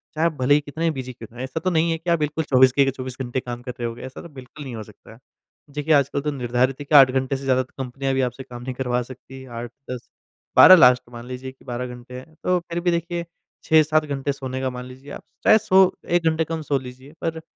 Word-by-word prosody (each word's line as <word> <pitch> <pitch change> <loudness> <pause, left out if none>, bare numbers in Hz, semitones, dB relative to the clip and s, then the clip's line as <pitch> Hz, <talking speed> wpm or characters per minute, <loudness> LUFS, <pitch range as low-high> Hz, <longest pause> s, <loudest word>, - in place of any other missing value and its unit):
चाहे 160 +2 +1
आप 165 - -2
भले 130 +3 +4
ही 150 - +2
कितने 155 +3 -2
बिज़ी 130 -3 -6
क्यों 115 -2 -11
ना - - -19
रहे। 125 - -4
ऐसा 130 +5 -4
तो 185 - 0
नहीं 165 -1 +2
है 165 - 0
कि 165 +2 -6
आप 170 -1 +3
बिल्कुल 150 +1 -1
24 130 -1 +6
के 135 +1 +3
24 130 -1 -7
घंटे 125 0 -2
काम 120 -1 -7
कर 125 0 -6
रहे 120 - -1
होंगे, 115 0 -7
ऐसा 130 +1 -8
तो 170 - -11
बिल्कुल 135 0 -11
नहीं 130 -4 -7
हो 110 - -6
सकता 105 -1 -17
है। 115 - -18 0.5
देखिए 150 +2 0
आजकल 140 -1 +2
तो 150 +1 -2
निर्धारित 125 0 0
है 145 - -6
कि 150 - +1
8 135 -2 +9
घंटे 130 +1 0
से 135 - -10
ज़्यादा 130 -1 +2
कंपनियाँ 135 +1 -4
भी 135 - +1
आपसे 125 +1 -3
काम 120 -1 -10
नहीं 130 0 -4
करवा 125 -1 -1
सकती, 130 +1 -12
8-10-12 120 +8 +2
लास्ट 125 -7 +6
मान 120 0 -9
लीजिए 130 +1 -6
कि 130 - -24
12 125 0 -4
घंटे 125 +1 -9
हैं, 155 +5 -16
तो 180 0 +2
फिर 170 0 -5
भी 175 0 +2
देखिए 170 0 -2 0.4
6-7 155 0 +4
घंटे 140 -1 -2
सोने 130 -1 -5
का 130 - 0
मान 125 0 -7
लीजिए 130 +3 -12
आप - - -8
स - - -47
चाहे 215 - +7
सो 190 -3 +4 0.2
1 175 0 +1
घंटे 160 0 0
कम 160 0 -4
सो 145 -2 0
लीजिए 130 +3 -12
पर 165 -1 -3
135 Hz, 260 wpm, -23 LUFS, 125-155 Hz, 0.5 s, 8